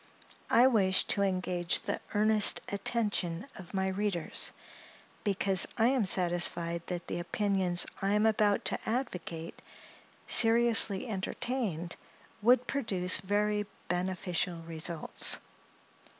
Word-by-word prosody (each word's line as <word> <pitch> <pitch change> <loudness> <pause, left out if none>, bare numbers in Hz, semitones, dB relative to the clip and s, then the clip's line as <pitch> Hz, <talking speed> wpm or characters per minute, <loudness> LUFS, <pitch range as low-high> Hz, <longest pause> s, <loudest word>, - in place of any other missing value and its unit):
I 240 +2 +5
wish 195 -7 +3
to 200 - +2
engage 185 -3 +1
the - - -4 0.2
earnest 215 0 +3
attention 200 -4 -2
of 190 +1 -11
my 190 0 0
readers; 190 -3 -1 0.7
because 195 -2 +4
I 230 +1 +3
am 260 -5 +1
satisfied 175 -2 +2
that 175 -1 -5
the - - -5
opinions 185 -1 +1 0.2
I 195 +1 0
am 210 +1 +2
about 210 -2 +1
to - - 0
advocate, 180 -9 -5 0.6
seriously 225 -2 +4
entertained, 195 -4 -4 0.4
would 245 +3 +3
produce 190 -9 +1
very 205 +2 -1 0.2
beneficial 180 -1 -2
results. 165 0 -2
195 Hz, 105 wpm, -30 LUFS, 175-215 Hz, 0.7 s, I